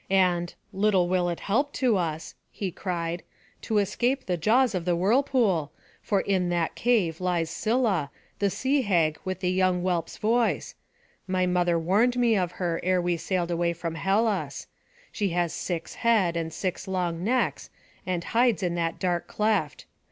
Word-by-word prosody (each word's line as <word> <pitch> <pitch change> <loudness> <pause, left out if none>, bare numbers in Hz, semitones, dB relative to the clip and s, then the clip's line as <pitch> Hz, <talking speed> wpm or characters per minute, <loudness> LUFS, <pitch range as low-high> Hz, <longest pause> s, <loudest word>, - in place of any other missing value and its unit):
And 180 -3 +2 0.2
"Little 195 -2 +2
will 180 -1 +1
it 170 - -4
help 275 +8 0
to 250 -5 +2
us," 160 -6 -2 0.2
he 195 -3 -4
cried, 170 -2 -3 0.4
"to 220 - -1
escape 245 +6 0
the 180 - 0
jaws 230 +8 +3
of 180 -3 -2
the 175 0 +1
whirlpool; 205 - +2 0.3
for 200 -3 +1
in 185 -3 0
that 170 -2 0
cave 195 -9 +1
lives 175 -3 0
Scylla, 215 - 0 0.3
the 200 - +2
sea 270 +7 +1
hag 170 -8 +1
with 185 0 -4
a - - +1
young 185 -1 +2
whelp's 175 -3 -1
voice; 230 +2 +1 0.5
my 185 -1 +1
mother 175 -1 +2
warned 205 +9 +2
me 235 -2 +3
of 180 -3 0
her 170 -3 -2
ere 185 0 +2
we 175 0 0
sailed 175 +1 -2
away 170 0 +1
from 165 -1 -4
Hellas; 200 +5 0 0.5
she 205 -3 -1
has 175 -2 +1
six 175 -3 -4
heads, 210 -7 +2
and 165 -1 -2
six 185 +3 -4
long 175 -3 -2
necks, 250 +5 0 0.3
and 180 -2 -2
hides 235 -5 +2
in 175 -1 0
that 165 -1 -1
dark 175 -2 -1
cleft. 210 -9 -1
185 Hz, 165 wpm, -26 LUFS, 170-215 Hz, 0.5 s, jaws